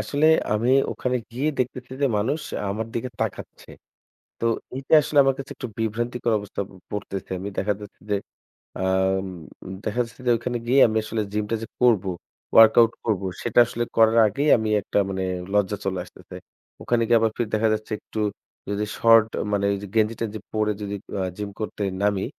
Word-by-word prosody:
আসলে 145 +2 +1 0.3
আমি 115 +4 +1 0.2
ওখানে 125 0 -1 0.2
গিয়ে 135 +6 -1
দেখতেছি 130 0 -3
যে, - - +5
মানুষ 140 +9 0 0.3
আমার 110 +2 -3
দিকে 120 +2 -2
তাকাচ্ছে। - - -5 0.7
তো 115 - -2 0.3
এইটা 135 +4 -3
আসলে 145 0 -2
আমার 135 -1 +2
কাছে 135 - -8
একটু 125 - -5
বিভ্রান্তিকর 120 +1 -1
অবস্থা 100 0 -5
প - - -18 0.2
পড়তেছে। 100 -2 -5
আমি 100 +2 -4
দেখা 105 +1 +1
যাচ্ছে 105 - -12
যে, - - +3 0.7
আ - - -1 0.4
উম 95 - -6 0.6
দেখা 110 +3 -1
যাচ্ছে 115 +2 -15
যে - - +4
ওখানে 120 +1 -3
গিয়ে 135 +3 +4
আমি 110 - -2
আসলে 110 0 -2
gym 105 0 0
টা 115 - +1
যে - - -4 0.2
করবো 105 -6 +4 0.5
workout 115 +1 +7
করবো 100 -4 0 0.2
সেটা - - 0
আসলে 120 0 -2
করার 115 0 +5
আগেই 140 +9 0
আমি 110 -1 -2
একটা 105 - -1
মানে 95 0 -2 0.3
লজ্জা 105 0 +1
চলে 95 -1 -1
আসতেছে। - - -13 0.5
ওখানে 120 -1 +1
গিয়ে 115 0 +5
আবার 115 -1 +2
ফের 115 -3 -1
দেখা 110 +1 +2
যাচ্ছে 110 +1 -6
একটু 110 - -9 0.5
যদি 100 +1 -1
short 115 -1 +6
আ - - 0
মানে 100 0 +1
ওই 100 - 0
যে - - -5
গেঞ্জি-টেঞ্জি 110 0 0
পড়ে 110 -1 +1
যদি 100 0 -4 0.3
আ - - 0
gym 105 -1 -4
করতে 105 -1 -4 0.2
নামি, 100 -2 +1
110 Hz, 185 wpm, -24 LUFS, 105-120 Hz, 0.7 s, workout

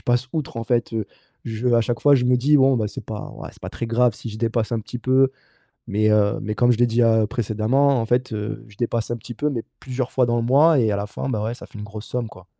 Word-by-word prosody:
je - - -23
passe 120 +1 0
outre 150 -6 -4
en 115 - -3
fait, 120 0 0
heu. 110 -3 -2 0.4
Je 115 +2 -2
à 120 -1 +4
chaque 120 +1 -2
fois, 145 -1 +6
je 125 - +1
me 125 0 +4
dis; 145 +4 +4
«Bon, 135 -1 +4
bah, 110 -3 0
c'est - - -8
pas 110 -1 -6
ouais - - -8
c'est - - -22
pas - - -5
très 115 - -4
grave 120 +1 +3
si 115 - -8
je 105 - -8
dépasse 115 0 -1
un 115 - 0
petit 120 +3 -7
peu», 130 +2 +3 0.6
mais, 110 +1 +1
heu, 105 -1 +2
mais 105 0 -3
comme 120 +1 +4
je 120 - +1
l'ai 120 - +5
dit, 120 +1 +2
heu, 110 -2 +3
précédemment 120 +4 +1
en 115 - -2
fait, 125 +1 0
heu, 105 0 -5
je 100 - -17
dépasse 115 0 -1
un 120 - -2
petit 120 - -9
peu 150 +5 0
mais 120 -5 -3 0.2
plusieurs 130 -1 -4
fois 130 - +2
dans 120 0 0
le - - +1
mois 145 +4 +5
et 110 -2 +2
à - - +1
la 100 +1 -3
fin, 135 - -5
bah, 110 -4 -1
ouais 115 - -2
ça - - -11
fait - - -13
une - - -6
grosse 105 +1 -8
somme 125 -2 -3
quoi. 95 0 -15
120 Hz, 300 wpm, -22 LUFS, 110-125 Hz, 0.6 s, fois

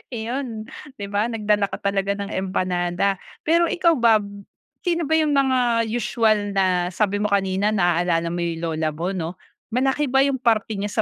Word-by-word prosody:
Iyon 230 -1 -4 0.3
'di 200 - -6
ba, 205 +3 +1
nagdala 210 -3 +1
ka - - -6
talaga 200 0 0
ng 200 +1 -5
empanada. 185 0 -1 0.2
Pero, 335 +2 +3
ikaw 340 -1 +3
ba 230 -2 +5
b 200 0 -11 0.4
sino 340 -1 +1
ba 320 +2 +1
'yung 305 -2 +2
mga 250 -4 +2
usual 215 -3 +1
na 180 -2 +2
sabi 205 +1 0
mo 210 - +1
kanina 200 +1 +1
naaalala 175 -3 +1
mo 175 - -3
'yung 170 -1 -2
lola 160 -1 -1
mo 175 +4 -2
'no. 170 -4 -3 0.5
Malaki 270 +3 +1
ba 270 +2 +3
'yung 275 -2 0
parte 220 -3 +1
niya 205 - -1
205 Hz, 175 wpm, -22 LUFS, 185-240 Hz, 0.5 s, ba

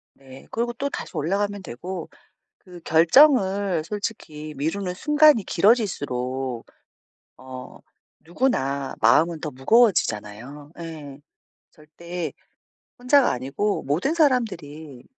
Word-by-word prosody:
네. 135 -1 -15
그리고 240 +1 -2
또다시 275 +4 -5
올라가면 200 +5 -1
되고 180 +6 -7 0.5
그 180 -3 -14
결정을 190 - +4
솔직히 160 -7 -6
미루는 180 +6 -2
순간이 300 -1 +4
길어질수록 135 - 0 0.7
어 130 -1 -10 0.4
누구나 140 - -1
마음은 155 +8 +3
더 150 - -4
무거워지잖아요. 135 - 0
예. 150 -4 -8 0.5
절대 165 +1 -7 0.7
혼자가 250 +2 +4
아니고 140 +12 -2
모든 170 - 0
사람들이 170 - -1
165 Hz, 240 characters per minute, -23 LUFS, 140-210 Hz, 0.7 s, 결정을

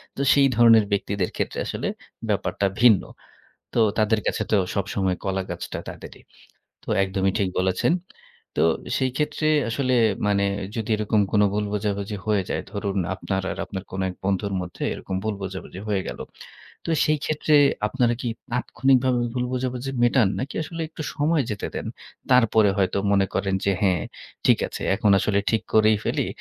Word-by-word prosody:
তো - - -3
সেই 140 -1 +5
ধরনের 115 -2 +6
ব্যক্তিদের 100 -2 0
ক্ষেত্রে - - -2
আসলে - - -3 0.4
ব্যাপারটা 100 - 0 0.2
ভিন্ন। 115 -6 +7 0.7
তো - - -1 0.2
তাদের 110 0 +2
কাছে - - 0
তো 105 - +4 0.2
সবসময় 95 -2 -1
কলাগাছটা 95 -1 -3
তাদেরই। - - -10 0.6
তো - - -23 0.2
একদমই 95 0 0
ঠিক 95 -2 +1
বলেছেন। 95 - +2 0.6
তো - - +4 0.3
সেই 130 -1 0
ক্ষেত্রে 150 +1 0 0.2
আসলে 130 +2 0 0.3
মানে 100 -1 +2 0.3
যদি 110 -2 -3
এরকম 105 0 +1
কোন 105 - +3
ভুল 105 0 0
বোঝাবুঝি 105 0 -2
হয়ে 105 -3 +1
যায় - - -1
ধরুন 100 -1 -3 0.2
আপনার 95 +1 -2
আর - - -6
আপনার 95 -1 -6
কোন 95 - -5
এক 90 - -8
বন্ধুর 100 +1 0
মধ্যে 90 -1 -6
এরকম 95 - -5
ভুল 110 -1 -1
বোঝাবুঝি 95 -1 -6
হয়ে 100 -2 0
গেল। - - -6 0.7
তো - - -3 0.2
সেই 155 0 +2
ক্ষেত্রে 155 0 +2 0.3
আপনারা 120 0 +1
কি - - -3 0.2
তাৎক্ষণিকভাবে 130 +1 +2
ভুল 125 -1 -1
বোঝাবুঝি 130 +1 -2
মেটান 120 -2 +4
নাকি 135 +3 -4
আসলে 165 +2 -6
একটু 160 - -8
সময় 150 -1 +2
যেতে 105 - -3
দেন? - - -4 0.4
তারপরে 110 -4 +5
হয়তো 95 0 +1
মনে 100 -1 +4
করেন 95 -1 0
যে 100 - +3
হ্যাঁ, 90 -5 +2 0.4
ঠিক - - +6
আছে। - - -8
এখন 105 0 +2
আসলে 100 0 +1
ঠিক 110 - +1
করেই 110 0 +5
ফেলি। - - 0
105 Hz, 165 wpm, -24 LUFS, 100-125 Hz, 0.7 s, ভিন্ন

